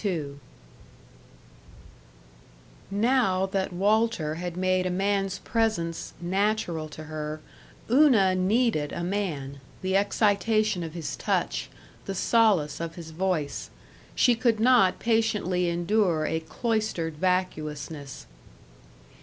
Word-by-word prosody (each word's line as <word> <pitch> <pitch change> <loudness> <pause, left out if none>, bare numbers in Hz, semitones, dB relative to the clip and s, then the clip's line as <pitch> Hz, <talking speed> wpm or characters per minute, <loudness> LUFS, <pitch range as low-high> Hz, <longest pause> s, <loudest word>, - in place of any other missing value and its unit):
§ 170 -9 -2
5 140 - -14 2.5
Now 205 -3 +2
that 195 0 -2
Walter 200 -3 +1
had 175 +1 -5
made 185 0 +1
a - - -1
man's 195 +1 0
presence 215 -8 -1
natural 180 -3 -1
to 155 +1 -9
her, 155 0 -5 0.5
Una 235 -8 +5
needed 185 -4 +1
a 170 - -3
man, 155 -8 -3 0.2
the 190 0 0
excitation 210 0 +2
of 165 -1 -6
his 165 -3 -4
touch, - - -1 0.4
the 195 - -4
solace 195 -9 +2
of 165 0 -5
his 165 -2 -9
voice. 165 -4 -2 0.5
She 245 - +4
could 230 -2 +1
not 230 -5 +4
patiently 210 -6 +1
endure 175 -2 +1
a 160 - -1
cloistered 170 -2 -2
vacuousness. 155 - -2
185 Hz, 110 wpm, -26 LUFS, 160-215 Hz, 2.5 s, Una